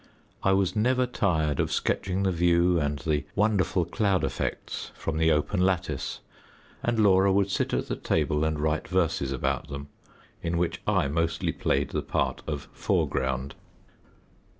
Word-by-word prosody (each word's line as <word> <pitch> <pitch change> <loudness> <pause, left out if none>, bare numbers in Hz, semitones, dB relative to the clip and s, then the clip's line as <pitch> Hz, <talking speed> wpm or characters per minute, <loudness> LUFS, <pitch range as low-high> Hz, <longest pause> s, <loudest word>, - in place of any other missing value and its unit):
I 95 - +3
was 95 0 +1
never 125 +4 +2
tired 80 - 0
of - - 0
sketching 95 +1 0
the 95 - +2
view 85 0 +3
and 75 -1 -1
the 75 +1 -1
wonderful 100 -4 +2
cloud 95 -1 +1
effects - - -3
from 80 -1 -3
the 80 0 +4
open 75 +6 +1
lattice, 90 -2 -1 0.6
and 120 -1 0
Laura 100 -2 +5
would 100 0 +2
sit - - 0
at - - -1
the - - -2
table 75 +1 0
and 80 -1 0
write 75 +1 0
verses 85 -7 0
about 65 +1 -1
them, 70 -1 -7 0.5
in 85 0 -1
which 85 0 -1
I - - +2
mostly 85 +3 0
played - - 0
the - - -1
part - - -1
of 75 -3 -4
foreground. 65 +1 -1
85 Hz, 155 wpm, -27 LUFS, 75-95 Hz, 0.6 s, Laura